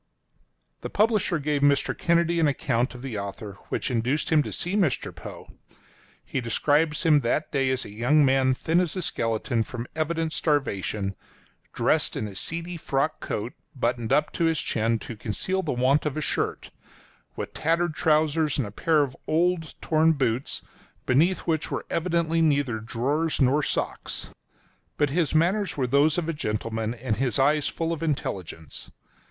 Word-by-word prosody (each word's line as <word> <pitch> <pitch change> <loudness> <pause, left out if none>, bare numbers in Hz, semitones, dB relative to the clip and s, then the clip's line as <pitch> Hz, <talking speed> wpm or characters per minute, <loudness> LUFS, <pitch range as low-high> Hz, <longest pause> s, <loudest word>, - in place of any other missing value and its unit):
The - - -5
publisher 210 -5 +2
gave 145 -1 -1
Mr. 140 0 +3
Kennedy 170 0 +2
an 160 - +4
account 130 -3 0
of 125 - -10
the 120 -6 -4
author, 100 0 -7
which - - -2
induced 125 +7 0
him 155 -2 +5
to - - -4
see 180 +3 -2
Mr. 175 -11 0
Poe. - - -9 0.8
He 130 - -2
describes 150 +7 +1
him 160 -3 +5
at - - +2
that 125 +6 -1
day 135 -2 +1
as 130 -1 -1
a - - -9
young 135 +7 +3
man 130 -1 +3
thin 165 +6 +1
as 180 -2 0
a 185 - -2
skeleton 115 -3 -1
from 115 +1 -5
evident 160 0 -1
starvation, 105 - -1 0.6
dressed - - +1
in 110 - -2
a 100 - -8
seedy 170 - -3
frock 150 0 -1
coat, 110 +4 -4 0.2
buttoned 120 -2 -1
up 150 - +2
to 170 - +1
his 165 -1 +2
chin 115 -2 0
to 115 - -8
conceal 150 - -2
the - - -2
want 130 +5 +2
of 150 - -3
a - - -1
shirt, - - -2 0.6
with - - -5
tattered 165 +1 +1
trousers, 155 -1 +2
and 135 - 0
a 100 - -7
pair 155 +7 +2
of 135 -2 -5
torn 170 +1 +2 0.4
old 160 -2 +4
boots, 130 -1 -1 0.4
beneath 160 +9 +3
which 160 -2 -1
were - - -3
evidently 165 -1 +1
neither 140 -7 +2
drawers 140 +9 -1
nor 135 +2 +4
socks. - - -3 0.7
But 145 -2 +2
his 160 -1 0
manners 185 +4 +2
were 135 - +1
those 140 +5 +3
of 170 -2 -1
a 165 - -1
gentleman, 110 -3 -2
and 115 -2 -2
his 130 0 +1
eyes 145 +2 +3
full 165 0 -2
of 165 - -6
intelligence. 95 - -4
145 Hz, 170 wpm, -26 LUFS, 120-165 Hz, 0.8 s, him